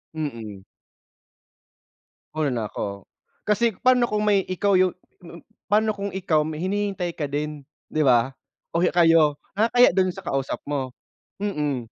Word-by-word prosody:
Mm. 115 -10 -5 1.7
Una 155 -2 0
na 115 -4 -2
ako, 100 -1 -5 0.4
kasi 215 0 +1
pa'no 250 -1 +3
kung 210 0 0
may 205 -2 +4
ikaw 200 +2 +1
'yung 185 0 +4 0.3
m 170 -1 -11 0.3
pa'no 215 +1 +3
kung 200 0 -4
ikaw 180 -5 +1
may 155 0 -4
hinihintay 195 -3 -2
ka 145 -3 -4
din 150 0 -3 0.3
'di 155 - +1
ba 130 -1 +3 0.4
o 170 - +1
kayo 165 -4 +4 0.2
nakakahiya 230 +1 +4
do'n 185 -1 +2
sa 190 +1 -8
kausap 135 -3 -2
mo, 140 -3 -2 0.5
mm. 150 - -2
170 Hz, 140 wpm, -24 LUFS, 145-200 Hz, 1.7 s, may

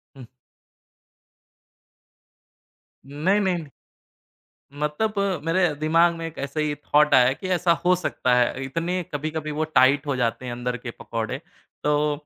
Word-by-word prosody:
हुँ। 130 -2 -11 2.8
नहीं, 155 +9 +1
नहीं, 190 -3 +1
नहीं, 160 -3 -7 1.1
मतलब 150 +9 -1 0.3
मेरे 170 -1 +2
दिमाग 165 +3 +3
में 165 0 -5
एक 165 - -9
ऐसे 145 +2 -2
ही 150 -1 -1
थॉट 150 +1 +2
आया 125 0 +6
कि 185 +7 -7
ऐसा 175 -1 +3
हो 180 +1 +5
सकता 130 -7 0
है। 125 +2 +1
इतनी 170 +6 -2
कभी-कभी 155 +1 -3
वो 155 +1 -1
टाइट 145 -1 +3
हो 140 - -1
जाते 125 0 -1
हैं 125 - -4
अंदर 125 +1 -3
के 120 0 -7
पकोड़े, 115 +2 -4 0.5
तो 150 0 +2
150 Hz, 140 wpm, -24 LUFS, 130-165 Hz, 2.8 s, आया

